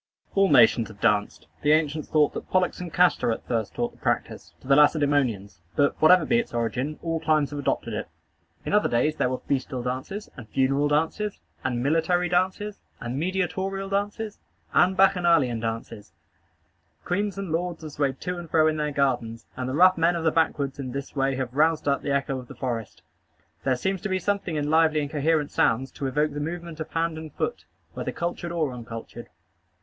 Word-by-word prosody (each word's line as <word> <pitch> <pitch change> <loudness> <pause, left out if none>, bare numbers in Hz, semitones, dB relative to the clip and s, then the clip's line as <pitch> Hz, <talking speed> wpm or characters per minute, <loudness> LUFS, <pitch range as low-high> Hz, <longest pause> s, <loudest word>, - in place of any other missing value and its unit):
All 195 -1 +4
nations 115 -1 +5
have 105 -2 -14
danced. 105 -2 +1 0.2
The 150 +1 +4
ancients 155 -1 0
thought 150 -2 +3
that - - -7
Pollux 185 -1 +1
and 175 -2 -6
Castor 180 -7 +3
at 110 - -4
first 115 -3 -2
taught 120 0 -1
the - - -23
practice - - -2
to - - -14
the 135 - +5
Lacedæmonians; 140 - +2 0.2
but, 145 -1 +3
whatever 165 +1 +6
be 235 - +3
its 235 - -4
origin, 130 +6 -2
all 165 -1 -1
climes 155 -2 +1
have 145 - -4
adopted 140 - -1
it. - - -4 0.6
In - - -2
other 210 - +3
days 140 +6 +1
there 125 - +1
were 130 - -1
festal 130 -2 -3
dances, 130 - -4
and 115 -4 -11
funeral 135 +3 +2
dances, 165 +8 0 0.2
and 125 -2 -1
military 165 +4 +2
dances, 190 +4 0 0.2
and 125 +2 -4
"mediatorial" 190 +2 -2
dances, 205 +2 -2 0.3
and 185 +1 +4
bacchanalian 170 -10 +4
dances. 115 -5 -5 0.9
Queens 200 +2 -1
and 195 -4 -4
lords 170 0 -2
have 155 - -7
swayed 140 -2 -1
to 180 -1 -3
and 170 -2 -9
fro 155 0 +4
in 155 0 +2
their 150 0 0
gardens; 120 -5 -1
and 130 0 -3
the 130 - -2
rough 185 +2 +5
men 170 +2 +3
of 165 - -2
the 160 - +3
backwoods 145 -4 0
in 130 -3 -5
this 140 +1 -6
way 135 -1 +1
have 130 -2 -3
roused 155 +2 +2
up 140 -1 +2
the - - -4
echo 140 -1 0
of 125 - -11
the - - -11
forest. 115 -5 -4 0.6
There 130 -1 +2
seems 190 +8 -2
to 210 - -3
be 185 - +1
something 195 -3 -1
in 145 -1 -1
lively 160 -1 +4
and 145 0 -4
coherent 150 0 +1
sounds 125 +4 +1
to 140 - -4
evoke 150 +2 0
the 145 - -4
movement 170 +1 -5
of 155 - -5
hand 165 -1 -1
and 160 -1 -8
foot, - - -3 0.3
whether - - -4
cultured 175 0 -4
or 155 -6 -1
uncultured. 120 0 -8
150 Hz, 200 wpm, -25 LUFS, 130-175 Hz, 0.9 s, whatever